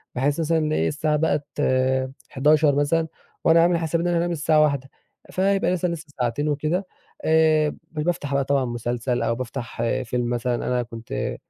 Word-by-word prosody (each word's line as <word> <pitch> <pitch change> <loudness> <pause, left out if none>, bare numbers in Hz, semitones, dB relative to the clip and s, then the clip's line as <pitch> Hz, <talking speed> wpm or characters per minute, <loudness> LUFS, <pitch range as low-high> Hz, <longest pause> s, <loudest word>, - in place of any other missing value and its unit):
بحيث 140 +5 0
مثلًا 155 - +1
الساعة 150 +1 0
بقت، 150 -1 0 0.8
23:00 150 +1 +3
مثلًا 160 +3 +1 0.4
وأنا 165 +1 +6
عامل 170 +1 +3
حسابي 165 0 -1
إن - - 0
أنا 175 -1 +1
أنام 175 +1 0
الساعة 155 -1 +3
01:00، 140 -3 +1 0.4
فيبقى 195 0 +1
لسه 180 0 0
لسه 170 -2 -4
ساعتين 125 +5 0
وكده. 155 +6 -1 0.4
آآ، 155 -1 +4
ب - - -8 0.2
بافتح 150 -3 -1
بقى 140 0 +2
طبعًا 140 -1 +1
مسلسل 120 +1 -2
أو 115 - 0
بافتح 125 0 -5 0.2
فيلم 120 +1 -1
مثلًا 120 0 0
أنا 125 +1 -1
كنت 115 -1 -5
150 Hz, 160 wpm, -23 LUFS, 125-165 Hz, 0.8 s, وأنا